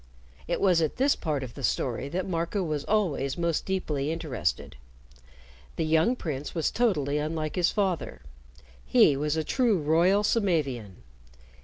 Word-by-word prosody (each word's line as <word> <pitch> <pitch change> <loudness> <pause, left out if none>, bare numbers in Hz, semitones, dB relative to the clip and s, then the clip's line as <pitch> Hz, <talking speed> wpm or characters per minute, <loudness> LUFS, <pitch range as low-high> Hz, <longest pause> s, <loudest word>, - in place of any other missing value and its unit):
It 170 - -1
was 180 -4 +3
at 155 - 0
this 275 +2 +3
part 150 -4 -2
of 120 -2 -8
the 140 - -9
story 130 +1 -1
that 185 +5 -3
Marco 170 +2 -1
was 155 -4 -2
always 170 -10 0
most 170 -2 -1
deeply 155 -7 -1
interested. 155 - -3 1.0
The 165 - -1
young 160 +10 +3
prince 150 - -5
was 165 - 0
totally 150 - +1
unlike 155 0 -3
his 180 -1 +3
father. 185 - -2 0.6
He 65 - +5
was 150 +3 -1
a 160 - 0
true 235 - +2
royal 170 +6 +3
Samavian. 140 - -1
160 Hz, 150 wpm, -27 LUFS, 145-185 Hz, 1.0 s, He